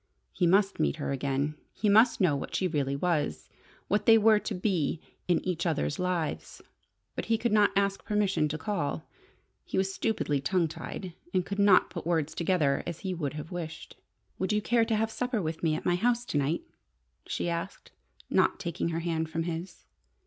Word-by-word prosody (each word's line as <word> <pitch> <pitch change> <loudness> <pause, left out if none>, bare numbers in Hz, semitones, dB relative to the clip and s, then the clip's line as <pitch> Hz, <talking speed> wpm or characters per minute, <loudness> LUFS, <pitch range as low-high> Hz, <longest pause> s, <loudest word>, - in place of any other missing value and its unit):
He 175 - +2
must 195 +2 +3
meet 70 -2 +2
her - - -3
again! 140 +2 -1 0.2
He 210 - -1
must 220 +4 +5
know 180 -7 +3
what 140 - -5
she 185 - +1
really 140 -5 -1
was 150 - -1 0.4
what 205 +1 0
they 225 -1 +9
were 220 -1 +5
to 210 - -4
be 180 -5 0 0.3
in 175 -2 +1
each 175 -1 -1
other's 155 -1 -1
lives. 180 -4 -2 0.6
But - - -3
he 225 - +2
could 235 +1 -1
not 210 -1 +5
ask 200 0 +1
permission 200 -7 +1
to 150 +1 -3
call. 160 -6 -3 0.6
He - - -4
was 190 0 +1
stupidly 170 -12 0
tongue 175 +3 +1
tied, 175 +3 -7 0.2
and 185 -1 +2
could 200 0 -4
not 200 -2 +5
put - - -6
words 160 -3 0
together 165 -5 +1
as 170 -2 -5
he 190 -2 -2
would 150 -6 -3
have 150 +3 -7
wished. 170 -3 -6 0.4
"Would 190 - 0
you 210 - +2
care 230 +2 +2
to 225 -1 0
have 220 +1 0
supper 250 0 -1
with 160 -3 -3
me 160 -2 +2
at - - -5
my 175 - +3
house 240 +6 +1
to 150 - -2
night?" 145 +4 0 0.6
she - - -2
asked, 170 +3 -4 0.4
not - - +2
taking 170 -1 -2
her 165 0 -2
hand 160 -1 -1
from 165 +1 -2
his. 170 +1 -6
175 Hz, 195 wpm, -29 LUFS, 160-205 Hz, 0.6 s, they